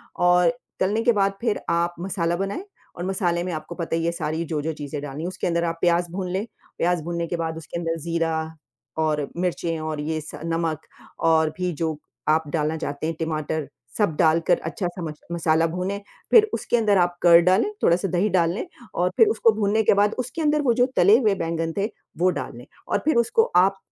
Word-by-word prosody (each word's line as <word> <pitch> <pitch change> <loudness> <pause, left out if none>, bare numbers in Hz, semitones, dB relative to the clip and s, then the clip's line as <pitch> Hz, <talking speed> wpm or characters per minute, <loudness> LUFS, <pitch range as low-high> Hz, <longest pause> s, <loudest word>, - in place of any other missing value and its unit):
और 180 +2 +4 0.3
तलने 205 +4 +1
के 240 - +5
बाद 200 -1 +2
फिर 225 -3 0
आप 170 +1 +1
मसाला 175 -2 -1
बनाएँ 200 - -3 0.3
और 175 - -5
मसाले 175 -3 0
में 185 - -3
आपको 155 +2 -6
पता 165 -2 -2
ही 165 0 -1
है 170 - +1
सारी 160 0 -2
जो-जो 160 0 -2
चीज़ें 145 -1 -6
डालनी 145 +2 -6
है - - -2
उसके 185 +1 -3
अंदर 170 -1 +1
आप 165 -1 -2
प्याज़ 175 0 +2
भून 185 0 -3
लें, 195 +3 -1 0.3
प्याज़ 175 -1 +1
भूनने 170 +1 -3
के 175 - -2
बाद 160 -1 -3
उसके 165 +1 -7
अंदर 165 -1 -2
ज़ीरा 160 -1 -2 0.4
और 155 -2 0
मिर्चें 170 -2 -1
और 155 -1 -4
ये 155 +1 -2
स 155 - -9
नमक 165 -1 -2 0.4
और 160 -1 +4
भी 180 -1 -1
जो 160 0 -2 0.3
आप 160 +1 +3
डालना 155 0 0
चाहते 145 -1 -4
हैं 165 - -2
टमाटर, 155 -2 -2 0.3
सब 205 -8 +1
डालकर 165 0 +3
अच्छा-सा 175 +1 -4
मस 150 - -10
मसाला 165 -1 +2
भुने, 180 +4 -3 0.3
फिर 435 -2 +7
उसके 240 - 0
अंदर 210 -3 +3
आप 175 -1 +1
कर्ड 170 -1 +7
डालें, 190 - +3
थोड़ा-सा 175 +3 +3
दही 185 +4 +1
डाल 170 -3 +2
लें 210 - -4 0.3
और 180 +1 +2
फिर 450 - +7
उसको 415 - +4
भुनने 210 +1 +2
के - - +5
बाद 205 +1 +2
उसके 330 - -6
अंदर 300 -1 +2
वो 255 -5 +3
जो - - +7
तले 200 +5 +7
हुए 215 -6 +2
बैंगन 165 -1 -2
थे, 200 +1 +1 0.3
वो 180 +2 +3
डाल - - -5
लें। - - -11 0.2
और - - +1
फिर 310 - +3
उसको 435 - +3
आप 190 +2 +4
170 Hz, 210 wpm, -24 LUFS, 160-190 Hz, 0.4 s, फिर